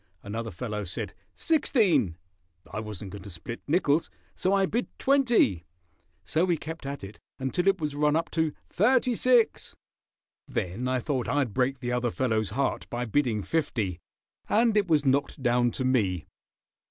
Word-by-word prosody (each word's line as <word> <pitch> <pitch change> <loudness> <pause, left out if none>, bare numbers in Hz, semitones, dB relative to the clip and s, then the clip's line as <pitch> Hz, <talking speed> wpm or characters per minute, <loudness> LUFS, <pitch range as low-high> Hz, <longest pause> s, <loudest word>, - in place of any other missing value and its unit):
Another 115 +3 -4
fellow 105 +2 -4
said 90 -2 -5 0.2
'sixteen.' 185 - +2 0.6
I 105 - -2
wasn't 105 -3 -7
going 100 - -8
to 100 - -9
split 95 +7 -7
nickels 155 -1 +2 0.3
so 185 - 0
I 195 -1 +4
bid 235 +6 -1
'twenty.' 240 - +3 0.6
So 160 +2 +1
we 175 -2 +2
kept 160 -1 -7
at 140 -4 -5
it 100 +1 -9 0.2
until 135 +8 -1
it 195 -1 +4
was 150 -2 -2
run 150 +1 +2
up 165 +1 -1
to 160 -2 +1 0.2
'thirty 250 +5 +3
six.' 245 0 +2 0.7
Then 95 +8 -2
I 130 0 +1
thought 130 -1 -2
I'd 135 -4 +1
break 130 +1 0
the 125 -1 -2
other 125 0 +1
fellow's 110 -4 0
heart 135 +7 -1
by 120 +1 -2
bidding 115 -3 +1
fifty, 110 - -1 0.5
and 225 0 +3
it 205 -2 +3
was 155 -4 +3
knocked 140 0 +1
down 120 0 +3
to 130 +2 -3
me." 100 -10 +1
135 Hz, 165 wpm, -27 LUFS, 110-170 Hz, 0.7 s, I